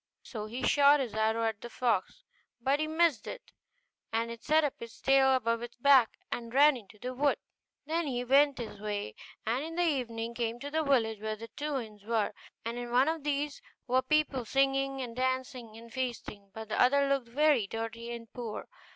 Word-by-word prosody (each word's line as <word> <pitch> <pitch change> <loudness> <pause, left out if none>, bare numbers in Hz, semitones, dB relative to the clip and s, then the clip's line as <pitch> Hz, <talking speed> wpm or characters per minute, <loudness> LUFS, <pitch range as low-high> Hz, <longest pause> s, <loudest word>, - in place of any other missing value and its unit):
So 215 -3 -6
he 245 +4 -6
shot 285 +2 +6
his 250 -5 -3
arrow 220 +1 +1
at 220 -2 -2
the 240 - -7
fox; 240 - -1 0.4
but 270 +4 +1
he 310 - 0
missed 315 -7 +2
it, - - -8 0.6
and 230 +1 -1
it 230 -1 -9
set 310 +1 +4
up 290 - 0
its 230 -1 -10
tail 270 -1 +5
above 230 -2 0
its 240 0 -7
back 260 -2 +5
and 235 -1 -4
ran 285 +3 +6
into 210 -3 -12
the 250 +4 -5
wood. 280 +2 +2 0.5
Then 325 +1 -1
he 245 -2 -2
went 280 +3 +4
his 225 -4 -6
way, 205 - -3 0.3
and 240 +5 0
in 325 +1 -6
the 350 - +2
evening 235 -6 -2
came 235 0 -2
to 285 +1 -5
the 315 +1 +1
village 230 -7 +1
where 215 0 -2
the 230 +2 -10
two 295 +2 -3
inns 215 -4 -10
were; 220 -1 0 0.3
and 235 +1 -3
in 240 0 -5
one 255 +5 +4
of 320 -2 -3
these 290 0 -2 0.2
were 255 +1 +2
people 275 -1 +1
singing, 270 +2 +1
and 235 -2 -6
dancing, 255 -3 -2
and 230 0 -13
feasting; 235 -6 -4
but 220 +1 -8
the - - +1
other 280 +3 +4
looked 275 -3 0
very 280 -4 +3
dirty, 225 +2 -5
and 230 -1 -8
poor. 235 -4 -6
250 Hz, 205 wpm, -30 LUFS, 230-280 Hz, 0.6 s, shot